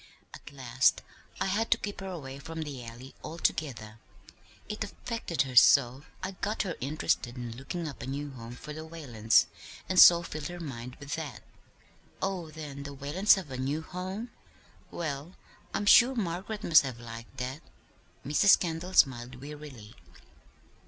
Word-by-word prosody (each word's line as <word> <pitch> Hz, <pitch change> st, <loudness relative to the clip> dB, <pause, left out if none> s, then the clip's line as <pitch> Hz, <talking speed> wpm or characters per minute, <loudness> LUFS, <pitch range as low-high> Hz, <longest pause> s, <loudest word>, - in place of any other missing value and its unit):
At -, -, -11 dB
last 130 Hz, -2 st, +2 dB, 0.4 s
I -, -, +1 dB
had 210 Hz, +4 st, 0 dB
to -, -, +4 dB
keep 205 Hz, -1 st, -5 dB
her 195 Hz, -, -6 dB
away 140 Hz, -7 st, -7 dB
from 160 Hz, +3 st, -5 dB
the 140 Hz, -5 st, -7 dB
Alley 120 Hz, +3 st, -10 dB
altogether, 130 Hz, -9 st, -2 dB, 0.7 s
it 210 Hz, +1 st, -3 dB
affected 205 Hz, -, -2 dB
her 130 Hz, -2 st, -7 dB
so. 130 Hz, +2 st, +6 dB, 0.2 s
I 190 Hz, -, -2 dB
got 205 Hz, +3 st, -2 dB
her 180 Hz, -5 st, -3 dB
interested 135 Hz, -3 st, -1 dB
in 120 Hz, -2 st, -5 dB
looking 160 Hz, +6 st, -5 dB
up 145 Hz, -, -8 dB
a -, -, -6 dB
new 140 Hz, +2 st, -4 dB
home 120 Hz, -2 st, -9 dB
for 150 Hz, +4 st, -8 dB
the 155 Hz, +1 st, -7 dB
Whalens, 130 Hz, -10 st, +2 dB, 0.4 s
and 185 Hz, -1 st, +2 dB
so 170 Hz, -1 st, +10 dB
filled 155 Hz, -3 st, -5 dB
her 175 Hz, 0 st, -7 dB
mind 125 Hz, -5 st, -7 dB
with 140 Hz, 0 st, -7 dB
that." 150 Hz, -7 st, -6 dB, 0.8 s
"Oh, 185 Hz, -4 st, -2 dB
then 150 Hz, -3 st, -8 dB
the 140 Hz, 0 st, -7 dB
Whalens 150 Hz, +11 st, +4 dB
have 180 Hz, -8 st, -6 dB
a 130 Hz, -, -4 dB
new 145 Hz, +5 st, -1 dB
home? 190 Hz, +7 st, -5 dB, 0.6 s
Well, 155 Hz, +1 st, -5 dB, 0.4 s
I'm 205 Hz, -, -2 dB
sure 245 Hz, +5 st, +7 dB
Margaret 200 Hz, +1 st, -3 dB
must 160 Hz, -2 st, +7 dB
have 130 Hz, -4 st, -6 dB
liked 115 Hz, +2 st, -10 dB
that." 130 Hz, +4 st, -4 dB, 0.6 s
Mrs. 150 Hz, +8 st, +6 dB
Kendall 175 Hz, +1 st, -3 dB
smiled 125 Hz, -1 st, +3 dB
wearily. 140 Hz, -6 st, -10 dB
150 Hz, 160 wpm, -30 LUFS, 130-175 Hz, 0.8 s, so